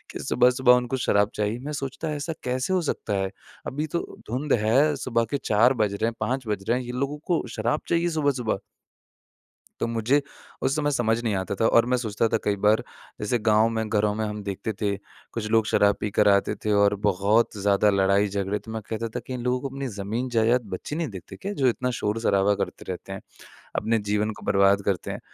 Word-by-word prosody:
कि -, -, -4 dB
सुबह-सुबह 125 Hz, 0 st, +4 dB
उनको 125 Hz, +1 st, +1 dB
शराब 105 Hz, -4 st, +2 dB
चाहिए। 105 Hz, +3 st, -1 dB
मैं 150 Hz, -, -4 dB
सोचता 140 Hz, +2 st, -4 dB
ऐसा 160 Hz, +3 st, -3 dB
कैसे 130 Hz, +7 st, -1 dB
हो 185 Hz, -, +2 dB
सकता 125 Hz, -8 st, -2 dB
है? 95 Hz, 0 st, -1 dB, 0.4 s
अभी 150 Hz, +3 st, -2 dB
तो -, -, +3 dB, 0.3 s
धुंध 135 Hz, +5 st, 0 dB
है, 140 Hz, +7 st, +4 dB
सुबह 115 Hz, -3 st, 0 dB
के 140 Hz, -, +1 dB
4 115 Hz, +5 st, +4 dB
बज 105 Hz, -5 st, 0 dB
रहे 100 Hz, +2 st, -1 dB
हैं 115 Hz, -, -2 dB
5 130 Hz, -1 st, -2 dB
बज 100 Hz, -2 st, -2 dB
रहे 120 Hz, -, +3 dB
हैं, 125 Hz, -, -6 dB
ये 120 Hz, -, -5 dB
लोगों 140 Hz, +3 st, -2 dB
को 175 Hz, -2 st, +1 dB
शराब 150 Hz, -, 0 dB
चाहिए 170 Hz, +1 st, +2 dB
सुबह-सुबह। 140 Hz, -10 st, 0 dB, 1.2 s
तो 115 Hz, -, +1 dB
मुझे 115 Hz, +5 st, +2 dB, 0.4 s
उस 135 Hz, +2 st, +1 dB
समय 145 Hz, -1 st, +1 dB
समझ 115 Hz, -3 st, +1 dB
नहीं 110 Hz, -4 st, 0 dB
आता 95 Hz, +1 st, -2 dB
था, 115 Hz, +3 st, +2 dB
और 115 Hz, -, +5 dB
मैं 125 Hz, +1 st, +1 dB
सोचता 115 Hz, -2 st, 0 dB
था 115 Hz, -, +2 dB
कई 105 Hz, -, +1 dB
बार 110 Hz, +1 st, +4 dB, 0.4 s
जैसे 110 Hz, +3 st, 0 dB
गाँव 110 Hz, 0 st, +4 dB
में 110 Hz, -1 st, -2 dB
घरों 105 Hz, -1 st, +2 dB
में 110 Hz, -, -1 dB
हम 105 Hz, 0 st, -4 dB
देखते 100 Hz, +2 st, -4 dB
थे। 100 Hz, -1 st, +1 dB, 0.4 s
कुछ 110 Hz, -2 st, -3 dB
लोग 110 Hz, -1 st, +4 dB
शराब 100 Hz, -2 st, +4 dB
पी 105 Hz, -, -2 dB
कर 105 Hz, -, +3 dB
आते 100 Hz, +1 st, +3 dB
थे 105 Hz, -, +2 dB
और 100 Hz, 0 st, +4 dB
बहुत 105 Hz, +4 st, +2 dB
ज़्यादा 100 Hz, +1 st, +3 dB
लड़ाई-झगड़े 100 Hz, +1 st, +1 dB
तो 110 Hz, -, -11 dB
मैं 110 Hz, 0 st, -4 dB
कहता 115 Hz, +1 st, -2 dB
था -, -, 0 dB
कि 130 Hz, -, -4 dB
इन 125 Hz, -, -4 dB
लोगों 125 Hz, +1 st, +1 dB
को 135 Hz, -, -3 dB
अपनी 135 Hz, -1 st, -3 dB
ज़मीन 110 Hz, +6 st, -2 dB
जायदात 120 Hz, +1 st, +3 dB
बच्चे 145 Hz, -, -6 dB
नहीं 165 Hz, 0 st, -1 dB
देखते 95 Hz, -3 st, -9 dB
क्या 200 Hz, +1 st, -5 dB
जो 135 Hz, -9 st, +1 dB
इतना 125 Hz, +1 st, 0 dB
शोर-शराबा 105 Hz, -2 st, +2 dB
करते -, -, -8 dB
रहते 95 Hz, +1 st, -6 dB
हैं? 95 Hz, -, -7 dB, 0.5 s
अपने 115 Hz, +2 st, +1 dB
जीवन 105 Hz, +1 st, +1 dB
को -, -, -12 dB
बर्बाद 100 Hz, 0 st, +4 dB
करते 95 Hz, -4 st, -1 dB
हैं। -, -, -5 dB
115 Hz, 220 wpm, -25 LUFS, 105-130 Hz, 1.2 s, और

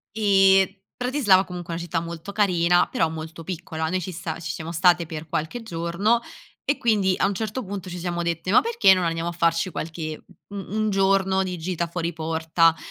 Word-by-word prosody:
e 195 Hz, -2 st, +4 dB
Bratislava 245 Hz, -7 st, +3 dB
comunque 175 Hz, -2 st, -7 dB
è -, -, -2 dB
una 170 Hz, -, -5 dB
città 165 Hz, 0 st, -1 dB
molto 170 Hz, +3 st, -7 dB
carina, 180 Hz, -4 st, +3 dB
però 165 Hz, -, 0 dB
molto 160 Hz, +1 st, -7 dB
piccola. 160 Hz, -2 st, -4 dB
Noi 185 Hz, +1 st, 0 dB
ci 185 Hz, +1 st, -5 dB
sta 165 Hz, -1 st, -5 dB
ci 160 Hz, -, -4 dB
siamo 165 Hz, +1 st, -6 dB
state 175 Hz, 0 st, +3 dB
per 160 Hz, -1 st, -7 dB
qualche 160 Hz, +11 st, -3 dB
giorno 195 Hz, +5 st, 0 dB, 0.4 s
e 285 Hz, +1 st, 0 dB
quindi 200 Hz, -5 st, +2 dB
a -, -, +2 dB
un 200 Hz, -, +1 dB
certo 220 Hz, +5 st, -3 dB
punto 195 Hz, -1 st, -6 dB
ci 180 Hz, -, -6 dB
siamo 175 Hz, 0 st, -3 dB
dette: 170 Hz, +2 st, -2 dB
"Ma -, -, +6 dB
perché 460 Hz, -, +5 dB
non 185 Hz, -1 st, 0 dB
andiamo 165 Hz, +1 st, -1 dB
a -, -, -3 dB
farci 170 Hz, +1 st, +1 dB
qualche 155 Hz, -1 st, -5 dB, 0.3 s
u 205 Hz, -, -9 dB
un 215 Hz, +2 st, -2 dB
giorno 195 Hz, 0 st, +2 dB
di 180 Hz, -1 st, -4 dB
gita 170 Hz, 0 st, -2 dB
fuori 170 Hz, 0 st, -3 dB
porta?" 160 Hz, +1 st, +2 dB
175 Hz, 200 wpm, -24 LUFS, 165-195 Hz, 0.4 s, Ma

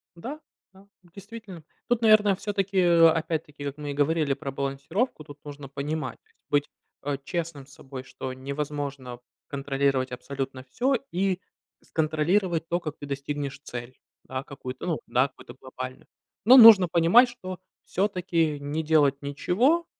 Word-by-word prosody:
Да, 260 Hz, -, -7 dB, 0.3 s
да, 195 Hz, +1 st, -19 dB, 0.2 s
действительно. 195 Hz, -1 st, -11 dB, 0.2 s
Тут, 240 Hz, -1 st, +1 dB
наверное, 215 Hz, -3 st, +5 dB
все-таки, 195 Hz, -1 st, -1 dB
опять-таки, 165 Hz, -3 st, +3 dB
вот 140 Hz, +1 st, -4 dB
мы 145 Hz, -1 st, -5 dB
и -, -, -4 dB
говорили 145 Hz, 0 st, +1 dB
про 140 Hz, 0 st, -6 dB
балансировку, 140 Hz, -, -2 dB
тут 145 Hz, 0 st, -12 dB
нужно 145 Hz, -1 st, -9 dB
понимать, 150 Hz, +3 st, -4 dB
то 440 Hz, -, -36 dB
есть 455 Hz, -, -35 dB
быть, 145 Hz, 0 st, +1 dB, 0.4 s
э, -, -, -2 dB
честным 165 Hz, -5 st, -4 dB
с 140 Hz, -, -17 dB
собой, 130 Hz, -2 st, -9 dB
что 130 Hz, 0 st, -7 dB
невозможно 140 Hz, -2 st, -5 dB, 0.3 s
контролировать 135 Hz, -2 st, 0 dB
абсолютно 135 Hz, +1 st, -5 dB
всё 245 Hz, -, 0 dB, 0.2 s
и 185 Hz, 0 st, 0 dB, 0.4 s
с -, -, -23 dB
контролировать 165 Hz, +2 st, +1 dB
то, 175 Hz, -, +1 dB
как 155 Hz, -4 st, -6 dB
ты 145 Hz, -, -8 dB
достигнешь 140 Hz, 0 st, -4 dB
цель. 120 Hz, -2 st, -8 dB, 0.2 s
Да, 130 Hz, 0 st, -5 dB
какую-то, 130 Hz, -1 st, -8 dB
ну 165 Hz, -4 st, 0 dB
да, 130 Hz, +3 st, +2 dB
какую-то 120 Hz, -, -14 dB
глобальную. 130 Hz, 0 st, -8 dB, 0.4 s
Но 250 Hz, +4 st, +9 dB
нужно 220 Hz, -6 st, +10 dB
понимать, 175 Hz, +10 st, +5 dB
что 185 Hz, -6 st, -8 dB, 0.2 s
все-таки 175 Hz, -6 st, 0 dB
не 145 Hz, +3 st, -3 dB
делать 145 Hz, -3 st, +3 dB
ничего 220 Hz, -, +1 dB
150 Hz, 150 wpm, -26 LUFS, 140-185 Hz, 0.4 s, нужно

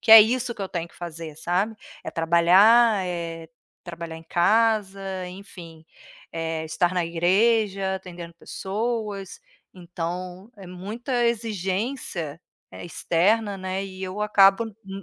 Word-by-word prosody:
que -, -, -1 dB
é 225 Hz, -, +13 dB
isso 240 Hz, +2 st, +1 dB
que -, -, -11 dB
eu 190 Hz, -, -4 dB
tenho 170 Hz, -1 st, -4 dB
que -, -, -23 dB
fazer, 165 Hz, -3 st, -7 dB
sabe, 180 Hz, +7 st, -1 dB, 0.3 s
é -, -, -4 dB
trabalhar, 190 Hz, +6 st, +5 dB
é 165 Hz, -2 st, -5 dB, 0.4 s
trabalhar 170 Hz, -2 st, -7 dB
em 160 Hz, -, -11 dB
casa, 210 Hz, +2 st, +2 dB, 0.3 s
enfim, 175 Hz, -4 st, -12 dB, 0.5 s
eh, 165 Hz, -1 st, -3 dB
estar 160 Hz, +3 st, 0 dB
na 180 Hz, -2 st, +1 dB
igreja, 195 Hz, +3 st, +2 dB
atendendo 175 Hz, -2 st, -10 dB
pessoas, 205 Hz, +1 st, -4 dB, 0.3 s
então 180 Hz, +3 st, -6 dB
é 195 Hz, -2 st, -11 dB
muita 230 Hz, +8 st, -3 dB
exigência 200 Hz, -, -2 dB, 0.4 s
externa, 200 Hz, +5 st, +1 dB
né, 190 Hz, +1 st, -3 dB
e 190 Hz, -1 st, -9 dB
eu 190 Hz, +2 st, -5 dB
acabo 200 Hz, 0 st, +5 dB, 0.2 s
n 195 Hz, 0 st, -8 dB
190 Hz, 130 wpm, -24 LUFS, 170-210 Hz, 0.5 s, é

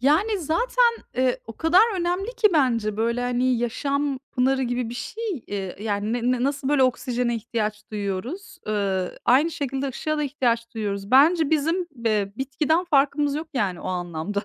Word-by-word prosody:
Yani, 360 Hz, -, +3 dB
zaten, 470 Hz, -, +2 dB, 0.2 s
eee, 255 Hz, 0 st, +1 dB
o 225 Hz, -, -7 dB
kadar 380 Hz, +7 st, +4 dB
önemli 360 Hz, +6 st, -1 dB
ki 445 Hz, -2 st, +5 dB
bence, 230 Hz, -9 st, +1 dB
böyle, 235 Hz, +2 st, 0 dB
hani, 245 Hz, 0 st, +1 dB
yaşam 275 Hz, +4 st, -1 dB
pınarı 265 Hz, +1 st, +2 dB
gibi 245 Hz, -1 st, -1 dB
bir 235 Hz, -, -6 dB
şey, 445 Hz, -, -6 dB, 0.2 s
eee, 195 Hz, -3 st, -4 dB
yani, 210 Hz, 0 st, -1 dB
ne 245 Hz, +1 st, +1 dB
na -, -, -2 dB
nasıl, 275 Hz, -1 st, -1 dB
böyle, 290 Hz, -2 st, +3 dB
oksijene 250 Hz, -1 st, 0 dB
ihtiyaç 215 Hz, -2 st, -3 dB
duyuyoruz, 215 Hz, -, -4 dB
ııı, 195 Hz, -3 st, -1 dB
aynı 275 Hz, +7 st, +4 dB
şekilde 275 Hz, -2 st, -3 dB
ışığa 310 Hz, +4 st, -2 dB
da -, -, 0 dB
ihtiyaç 240 Hz, -5 st, -1 dB
duyuyoruz. 200 Hz, -2 st, -3 dB
Bence 310 Hz, +4 st, +5 dB
bizim 325 Hz, +4 st, +1 dB
be 215 Hz, -6 st, -1 dB
bitkiden 300 Hz, +6 st, 0 dB
farkımız 285 Hz, -2 st, +2 dB
yok, 315 Hz, +2 st, -4 dB
yani, 195 Hz, -8 st, -1 dB
o -, -, -7 dB
anlamda. 180 Hz, +2 st, -3 dB
255 Hz, 165 wpm, -24 LUFS, 220-300 Hz, 0.2 s, ki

